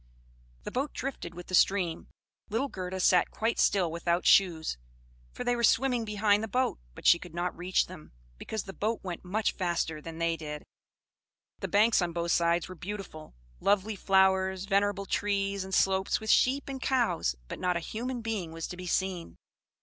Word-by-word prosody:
The - - -6
boat 270 +3 -2
drifted 240 -10 -5
with 175 0 -8
the - - -11
stream, 180 -3 +2 0.4
little 240 +6 -1
Gerda 185 -2 -5
sat 180 -1 +4
quite 225 +1 -1
still 185 -5 +3
without 170 +1 -1
shoes, 165 - +3 0.5
for - - -6
they 245 - +1
were 235 - -2
swimming 245 0 +3
behind 210 -1 +2
the 220 - -3
boat, 255 +4 0 0.2
but - - -12
she 170 - +7
could 175 -2 -11
not 175 +1 -2
reach 180 +1 +1
them, 180 -4 -12 0.3
because 220 -1 -4
the 195 - -9
boat 220 +3 -2
went 180 -3 -5
much 205 +4 0
faster 170 -4 -2
than 165 +1 -8
they 170 0 +1
did. 150 -1 -6 1.0
The - - -3
banks 215 +1 +4
on 175 -1 -1
both 170 0 -1
sides 170 0 +2
were 185 - -8
beautiful; 180 - -8 0.2
lovely 205 +1 +1
flowers, 190 -1 +2
venerable 200 0 +1
trees, 200 -1 -1
and 190 - -8
slopes 190 0 +2
with 220 0 0
sheep 270 +2 +3
and 270 -1 -5
cows, 225 - +1
but - - -7
not 180 -1 +1
a - - -1
human 240 +7 -4
being 215 -7 -3
was 165 0 -5
to 180 - -7
be 180 0 -7
seen. 185 -1 -2
190 Hz, 185 wpm, -29 LUFS, 175-215 Hz, 1.0 s, she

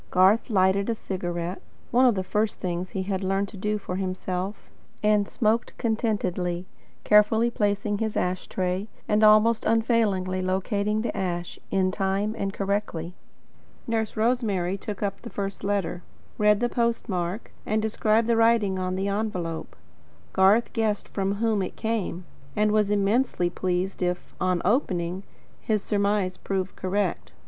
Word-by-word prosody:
Garth 190 +7 +4
lighted 195 0 +3
a 230 - +1
cigarette 175 -3 -4 0.3
one 255 +2 +5
of 240 - +3
the 190 - -1
first 210 +3 -1
things 180 0 -3
he 190 - -3
had 190 0 -2
learned 195 +1 0
to - - -11
do 210 +2 -1
for 185 -3 -5
himself 185 +1 -3 0.4
and 210 -1 +3
smoked 225 +1 0
contentedly, 190 -6 -1 0.4
carefully 220 +3 +4
placing 205 -1 0
his 220 -1 -1
ash 180 0 -1
tray, 185 +2 -2 0.2
and 210 0 +3
almost 215 +2 +6
unfailingly 220 -5 +1
locating 200 +3 0
the - - -2
ash, 175 -2 -3
in 185 -1 +2
time 195 +2 0
and 195 -3 -2
correctly. 195 -4 -2 0.7
Nurse 225 -2 -1
Rosemary 215 -6 +1
took 205 +1 -5
up 200 -1 -2
the 235 - -8
first 200 -2 -4
letter, 195 -4 -1 0.4
read 210 0 +4
the 240 - +3
postmark, 225 -6 -1
and 215 +1 0
described 220 +1 +2
the 235 0 +2
writing 225 -4 +3
on 185 0 -1
the 190 +1 -1
envelope. 195 -6 -3 0.6
Garth 195 +5 +4
guessed 220 -3 0
from 195 0 -1
whom 220 -1 +1
it 185 - -4
came, 215 -6 -2 0.3
and 210 0 +3
was 210 -1 +2
immensely 205 -2 +1
pleased 185 +1 -2
if, 180 0 -2
on 185 -2 +1
opening, 185 -5 0 0.4
his 215 -3 -1
surmise 200 -2 0
proved 190 -1 -3
correct. 185 -1 -2
200 Hz, 150 wpm, -26 LUFS, 185-215 Hz, 0.7 s, almost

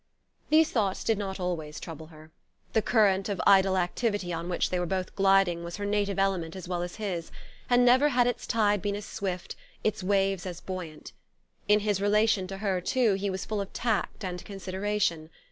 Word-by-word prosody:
These 315 +1 +4
thoughts 200 -5 0
did 225 -2 +1
not 195 -1 -4
always 160 -4 -3
trouble 160 -1 -8
her. 155 0 -15 0.4
The 220 - +3
current 200 -3 +2
of 200 - -2
idle 190 -1 +5
activity 185 0 -1
on 170 +1 -4
which 175 - 0
they 180 - 0
were 175 - -1
both 185 +1 -3
gliding 195 -3 +3
was 170 0 -6
her 205 - -4
native 205 -1 0
element 190 -4 0
as 185 -2 -8
well 175 -1 -2
as 175 0 -5
his; 185 -6 -4 0.4
and 245 0 +5
never 260 +4 +5
had 245 -3 +3
its 245 -1 -2
tide 210 -3 +2
been 200 +1 -1
as 205 0 -6
swift, 185 -4 -4 0.3
its 215 - 0
waves 195 -1 +1
as 175 -2 -6
buoyant. 180 -5 -7 0.6
In 210 0 +4
his 205 -2 0
relation 210 -1 +2
to 195 +1 -6
her, 195 -3 -1
too, 230 +3 +2
he 195 +1 -1
was 190 0 -4
full 215 -2 -2
of 200 - -6
tact 220 -3 -1
and 180 -1 -5
consideration. 190 -4 -2
195 Hz, 195 wpm, -28 LUFS, 180-210 Hz, 0.6 s, idle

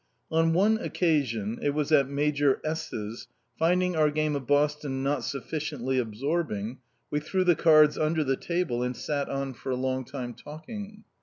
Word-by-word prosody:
On 165 0 +3
one 210 +5 +3
occasion 125 - 0
it 145 0 0
was 150 0 -1
at 140 -3 +4
Major 145 -1 +2
S 160 +1 -2
's 110 +2 -6 0.3
finding 180 +2 +2
our 155 -1 +4
game 155 0 0
of 135 -3 -4
Boston 145 -2 +1
not 140 0 0
sufficiently 135 -2 -2
absorbing, 120 -1 -2 0.3
we 150 - +1
threw 185 +5 0
the 180 -1 +5
cards 155 -1 +5
under 155 0 +1
the 135 -1 +1
table 170 -7 -1
and 125 -1 -2
sat 145 -2 -2
on 135 -1 -3
for 130 - -6
a - - +1
long 130 0 -1
time, 125 -2 -6
talking. 205 - -9
145 Hz, 170 wpm, -27 LUFS, 130-160 Hz, 0.3 s, the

